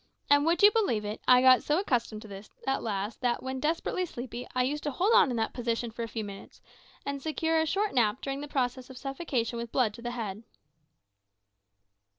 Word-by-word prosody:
And 285 +2 +5
would 340 +3 +2
you 415 - +9
believe 385 - +1
it, 210 +1 -5
I 250 0 +7
got 255 -1 +7
so 300 - +1
accustomed 235 - -1
to - - -10
this 200 +1 -10 0.2
at 270 0 0
last 205 +1 -3
that, 245 -2 0
when 260 0 -3
desperately 325 +5 -1
sleepy, 245 -3 -7
I 250 - +3
used 290 +4 -1
to - - +1
hold 380 - +1
on 285 - +6
in 245 - -2
that 225 - -1
position 235 -1 -2
for 235 - -7
a 230 - -2
few 225 -1 -4
minutes, 200 -1 -10 0.5
and 280 0 -3
secure 320 +1 0
a 320 - +1
short 405 +5 0
nap 235 -1 +2
during 275 0 -4
the 295 - -6
process 255 -2 -2
of 260 - -10
suffocation 265 -5 -2
with 235 -1 -6
blood 235 -5 +2
to 235 - -11
the 240 - -3
head." 220 -4 -5
250 Hz, 215 wpm, -29 LUFS, 230-290 Hz, 0.5 s, you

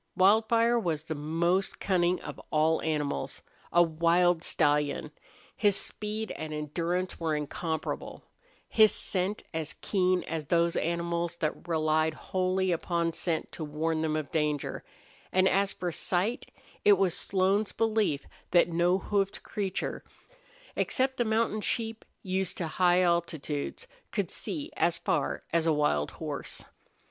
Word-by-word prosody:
Wildfire 225 +4 +4
was 165 -7 -1
the 160 - -4
most 165 +5 0
cunning 180 -2 +2
of - - -8
all 155 +1 +2
animals 145 -3 -2 0.3
a 175 - +6
wild 170 +1 +3
stallion; 150 -1 +1 0.4
his 205 -3 +3
speed 215 +1 -3
and 155 0 -5
endurance 170 +5 -2
were 160 -2 0
incomparable; 160 +2 -4 0.4
his 215 -1 +6
scent 190 +2 -2
as 160 -1 -2
keen 185 -2 +1
as 160 -2 -4
those 170 +2 +2
animals 170 0 -1
that 160 0 -3
relied 155 -1 +1
wholly 185 +1 0
upon 170 0 0
scent 165 -1 -2
to 160 - -6
warn 155 +2 -1
them 155 -1 0
of 155 -2 -3
danger; 150 -3 -1 0.5
and 185 0 +4
as 195 +1 +2
for 180 -1 -3
sight, 190 +8 -1 0.3
it 205 - +7
was 190 -3 +2
Slone's 195 +2 +1
belief 215 -10 +1 0.2
that 175 0 +4
no 175 +2 +3
hoofed 195 0 -1
creature, 195 -4 -3 0.7
except 260 +1 +1
the 240 - +1
mountain 220 -1 +1
sheep 225 0 -2 0.2
used 190 -1 -1
to 175 - -1
high 175 +3 +3
altitudes, 170 - -1 0.3
could - - -1
see 305 0 -4
as - - +2
far - - -1
as 165 -1 +2
a 160 - +4
wild 150 - +1
horse. - - -5
175 Hz, 135 wpm, -29 LUFS, 160-195 Hz, 0.7 s, it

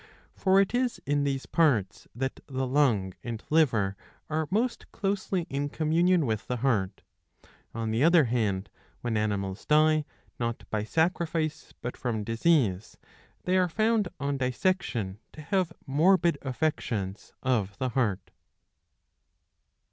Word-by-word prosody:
For 190 0 +3
it 195 +2 +2
is 245 -1 0
in 145 +1 +1
these 135 -1 -1
parts 120 - +1
that 130 +2 -3
the 130 -1 -2
lung 125 -9 +2
and 115 -2 -5
liver 115 -11 +3 0.4
are 155 0 0
most 230 +6 -1
closely 195 -3 -1
in 140 +1 -2
communion 165 +2 +2
with 110 -3 -2
the 125 - -1
heart. 100 -7 0 0.7
On 115 -1 -2
the 115 +4 +1
other 170 0 +6
hand 110 -6 -1 0.3
when 120 -2 -2
animals 100 -2 -1
die 155 0 +4 0.3
not 115 -1 -3
by 105 -1 -1
sacrifice 160 +1 -1
but 125 - -3
from 115 -4 -2
disease, 115 - +1 0.5
they 185 +1 +2
are 180 -1 +3
found 215 +2 +2
on 140 0 -1
dissection 125 - -1
to 155 - -9
have 185 +1 0
morbid 170 +2 +3
affections 120 -8 -2
of 110 -6 0
the 130 - -1
heart. 110 -6 -1
135 Hz, 135 wpm, -28 LUFS, 110-165 Hz, 0.7 s, other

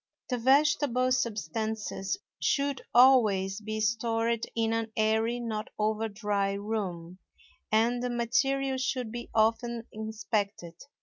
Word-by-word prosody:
The 250 -2 -1
vegetable 265 -1 +3
substances 220 - -2 0.2
should 280 -1 0
always 215 -6 +5
be 215 0 -4
stored 230 +1 0
in 225 -1 +1
an 225 -1 -2
airy, 220 +2 +1
not 220 -3 -3
over 215 +1 0
dry 200 -1 -1
room; 190 -4 -4 0.5
and 230 +3 +2
the 250 - -1
material 265 +3 0
should 250 -3 -2
be 240 +1 -6
often 230 +1 +1
inspected. 215 -4 -3
225 Hz, 115 wpm, -29 LUFS, 215-245 Hz, 0.5 s, always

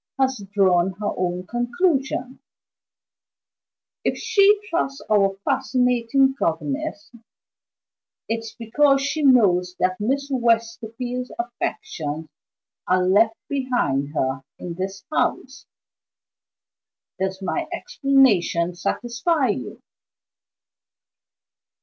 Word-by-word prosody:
has 260 -5 +1
drawn 190 -2 +3
her 205 +2 -3
own 180 0 -2
conclusions. 260 - -1 1.6
If - - 0
she 405 +1 +4
trusts 275 -7 -1
our 195 -2 +3
fascinating 260 0 +2
governess, 290 - -2 1.2
it's 225 0 -4
because 275 +5 +3
she 285 +3 -1
knows 190 -10 +4
that 185 0 0
Miss 275 +6 -1
Westerfield's 235 +1 -1
affections 235 - -4 0.6
are 185 0 +2
left 220 +4 +4
behind 245 - -1
her 130 -1 -1 0.2
in 175 - -6
this 190 +2 -5
house. 265 -2 -1 1.5
Does 190 0 -2
my - - -2
explanation 260 - +2
satisfy 255 - -1
you?" 130 - -4
235 Hz, 85 wpm, -23 LUFS, 185-270 Hz, 1.6 s, she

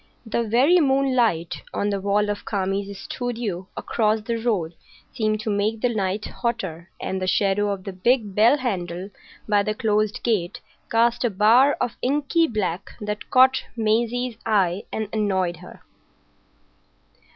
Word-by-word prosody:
The 225 +1 -1
very 255 +11 +4
moonlight 260 - +1
on 205 +1 0
the 200 -1 -2
wall 205 +1 +1
of 205 - -5
Kami's 195 0 -2
studio 225 -8 -4
across 220 -1 +1
the 230 +2 -2
road 210 -8 -1 0.4
seemed 215 -3 0
to 215 - -2
make 210 +2 0
the 245 -1 +1
night 200 0 -1
hotter, 190 -8 -4
and 190 0 -3
the 185 - -1
shadow 200 +2 +2
of 195 -2 -4
the 195 - -6
big 210 +2 +1
bell 225 +8 +5
handle 190 - -3 0.4
by 205 -1 +3
the 215 +1 -2
closed 215 -1 0
gate 205 -7 0 0.3
cast 235 +2 +2
a 240 - +2
bar 225 +8 +5
of 245 - -2
inky 295 +5 +2
black 195 - -3
that 210 0 -5
caught 260 +1 +5
Maisie's 230 +2 0
eye 195 -4 +1
and 220 -1 -3
annoyed 190 -5 0
her. - - -13
215 Hz, 150 wpm, -23 LUFS, 195-235 Hz, 0.4 s, bell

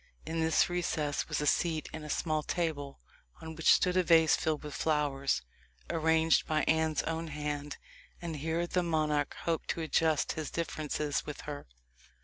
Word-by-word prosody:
In 165 0 -3
this 160 0 +3
recess 160 -5 -1
was - - -1
a - - -1
seat 160 +1 +1
and 160 - -6
a 150 - -8
small 155 0 0
table, 150 -4 -3 0.4
on 160 0 -7
which 160 - +4
stood 180 0 +4
a 185 - +5
vase 165 -2 +5
filled 155 -1 -1
with 150 -1 -7
flowers, 145 - 0 0.5
arranged 160 0 +3
by 155 -1 +1
Anne's 160 -1 +2
own 165 0 -3
hand; 145 -1 -4 0.4
and 170 -3 -5
here 160 +3 -1
the 180 +1 0
monarch 155 -4 0
hoped 165 -1 -2
to 165 - -1
adjust 160 -1 +2
his 155 -2 -4
differences 150 -2 -2
with 150 - -6
her. 145 -1 -7
160 Hz, 165 wpm, -31 LUFS, 150-165 Hz, 0.5 s, a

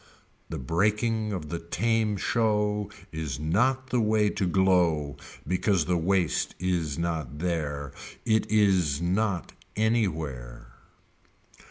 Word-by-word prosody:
The - - -4
breaking 105 - 0
of 85 -7 -4
the 85 +1 -3
tame 105 +5 0
show 105 -1 +1 0.2
is 80 -4 -4
not 125 - +1
the 125 - +2
way 105 -1 +2
to 95 - -1
glow 85 -6 +2 0.3
because 90 -2 +2
the 90 - +1
waste 90 0 +1
is 85 -5 -1
not 80 -3 -2
there. 75 -4 -2 0.3
It 110 -1 +2
is 95 -9 +3
not 95 +1 0 0.2
any 110 0 +3
where. 60 -8 -6
90 Hz, 120 wpm, -27 LUFS, 80-105 Hz, 0.3 s, is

